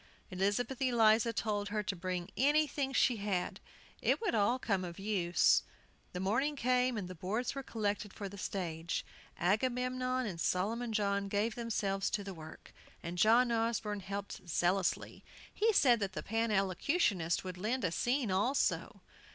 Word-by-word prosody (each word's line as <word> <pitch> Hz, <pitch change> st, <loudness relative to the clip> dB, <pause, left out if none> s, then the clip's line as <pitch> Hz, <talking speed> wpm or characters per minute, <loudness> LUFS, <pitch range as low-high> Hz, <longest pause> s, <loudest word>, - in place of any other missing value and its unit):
Elizabeth 205 Hz, +8 st, -1 dB
Eliza 230 Hz, -3 st, +4 dB
told 205 Hz, -2 st, -2 dB
her 210 Hz, 0 st, -1 dB
to 200 Hz, -, -2 dB
bring 180 Hz, 0 st, -4 dB
anything 285 Hz, +2 st, +2 dB
she 250 Hz, -2 st, +3 dB
had, 200 Hz, -3 st, -2 dB, 0.4 s
it -, -, +2 dB
would 445 Hz, -, -1 dB
all 220 Hz, +3 st, +3 dB
come 195 Hz, -7 st, -1 dB
of 170 Hz, -1 st, -6 dB
use. 190 Hz, -4 st, +3 dB, 0.5 s
The 180 Hz, -, -4 dB
morning 240 Hz, +11 st, +1 dB
came, 250 Hz, -2 st, +1 dB
and 195 Hz, -4 st, -3 dB
the 185 Hz, -, -7 dB
boards 195 Hz, +8 st, -2 dB
were 275 Hz, -, -4 dB
collected 210 Hz, -4 st, -2 dB
for 200 Hz, 0 st, -6 dB
the 200 Hz, -, -9 dB
stage. 170 Hz, -4 st, -3 dB, 0.3 s
Agamemnon 255 Hz, +6 st, 0 dB
and 175 Hz, -6 st, -4 dB
Solomon 225 Hz, +6 st, 0 dB
John 200 Hz, -2 st, 0 dB
gave 210 Hz, +3 st, 0 dB
themselves 200 Hz, -4 st, -1 dB
to 205 Hz, -, -2 dB
the 195 Hz, -1 st, -6 dB
work, 160 Hz, -2 st, -12 dB, 0.3 s
and 170 Hz, +1 st, -5 dB
John 230 Hz, +6 st, +5 dB
Osborne 225 Hz, -2 st, 0 dB
helped 195 Hz, -2 st, -6 dB
zealously. 180 Hz, +3 st, 0 dB, 0.3 s
He 450 Hz, +2 st, +3 dB
said 250 Hz, -, +5 dB
the 195 Hz, -2 st, -3 dB
Pan 225 Hz, +2 st, 0 dB
Elocutionists 195 Hz, -, +1 dB
would 180 Hz, -1 st, -6 dB
lend 230 Hz, +6 st, -1 dB
a 180 Hz, -, +1 dB
scene 245 Hz, +3 st, 0 dB
also. 240 Hz, +9 st, 0 dB
210 Hz, 155 wpm, -33 LUFS, 190-245 Hz, 0.5 s, John